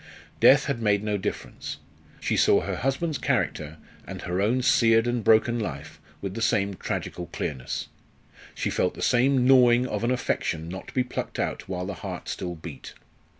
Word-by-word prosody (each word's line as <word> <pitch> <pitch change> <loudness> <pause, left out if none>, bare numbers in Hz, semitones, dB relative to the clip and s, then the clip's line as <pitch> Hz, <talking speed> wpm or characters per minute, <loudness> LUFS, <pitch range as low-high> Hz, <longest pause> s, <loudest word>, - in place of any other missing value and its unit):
Death - - +6
had 130 -4 -2
made 105 -2 +2
no 105 -1 0
difference. 95 - -5 0.4
She - - -1
saw - - +4
her - - -3
husband's 140 +4 -1
character 75 +1 -1 0.3
and - - -7
her 90 +2 -1
own 120 +5 +1
seared 115 -3 +4
and 120 -1 -1
broken 110 +3 +4
life 75 -8 -6 0.2
with 95 -1 -3
the 115 - -5
same 100 -3 +1
tragical 90 -1 -4
clearness; 65 -4 -4 0.7
she - - -2
felt - - 0
the - - -5
same 125 +1 +3
gnawing 125 -2 +6
of 105 -3 -3
an 120 - +1
affection 85 -9 -1
not 95 +2 -7
to - - -11
be 130 - +3
plucked 125 - -5
out - - -3
while 90 -1 -3
the 100 - -4
heart 80 - -7
still 90 -1 -4
beat. 80 -3 -10
110 Hz, 180 wpm, -26 LUFS, 90-125 Hz, 0.7 s, Death